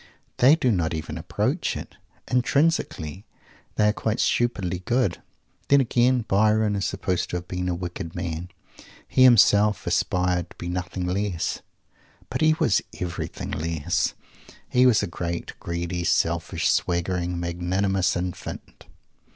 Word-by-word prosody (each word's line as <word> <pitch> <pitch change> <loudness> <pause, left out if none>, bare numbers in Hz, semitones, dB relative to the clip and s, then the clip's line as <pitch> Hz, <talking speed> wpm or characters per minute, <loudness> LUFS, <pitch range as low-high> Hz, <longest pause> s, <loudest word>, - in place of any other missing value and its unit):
They 135 +5 +6
do 130 -7 +1
not 85 -5 0
even 80 - -5
approach - - -1
it. - - -9 0.3
Intrinsically 125 - 0 0.5
they 105 0 +3
are - - +1
quite 110 0 -2
stupidly 95 -7 0
"good." 105 -1 0 0.5
Then, 140 - +6
again, 125 0 +3
Byron 105 +1 +3
is 100 - -1
supposed 90 -2 -2
to - - -4
have 90 0 -4
been 90 0 -3
a 90 - -1
wicked 85 -1 -6
man. 85 0 -4 0.6
He - - +1
himself 105 -4 +5
aspired 90 -1 0
to - - -16
be 85 - -6
nothing 90 +1 -3
less. 90 -1 -2 0.7
But - - -2
he 155 0 +5
was 115 -9 +2 0.2
everything 90 -2 -4
less. 80 -1 -1 0.5
He 125 +1 +4
was 115 -4 +4
a - - -1
great, 85 0 -4
greedy, 85 +1 -3
selfish, - - +1
swaggering, 90 0 -1
magnanimous 90 +2 0
infant! 90 0 -6
90 Hz, 135 wpm, -24 LUFS, 85-110 Hz, 0.7 s, They